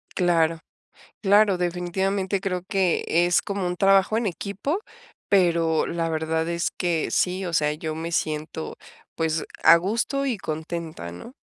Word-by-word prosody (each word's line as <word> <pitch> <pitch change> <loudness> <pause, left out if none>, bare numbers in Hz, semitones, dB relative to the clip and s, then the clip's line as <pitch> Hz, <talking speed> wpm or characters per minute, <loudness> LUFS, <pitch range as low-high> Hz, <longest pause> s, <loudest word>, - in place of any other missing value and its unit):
Claro. 165 -3 +2 0.6
Claro, 200 -1 +4
definitivamente, 185 +2 -1
creo 180 -2 -2
que 190 -3 +1
es 175 +1 +3
como 200 -2 -3
un 180 0 -2
trabajo 195 +2 +4
en 230 0 0
equipo, 200 - -3 0.5
pero 170 -4 +3
la 165 -1 -2
verdad 160 0 -1
es 170 0 -1
que 170 -3 -1
sí, 185 +1 0
o 175 - -4
sea, 150 -2 +2
yo 155 0 -4
me 165 +1 -4
siento, 155 0 -3 0.4
pues, 160 -1 0 0.2
a 170 - +8
gusto 230 +10 -1
y 250 -6 -1
contenta, 160 - -5
¿no? 90 - -10
175 Hz, 145 wpm, -24 LUFS, 160-195 Hz, 0.6 s, a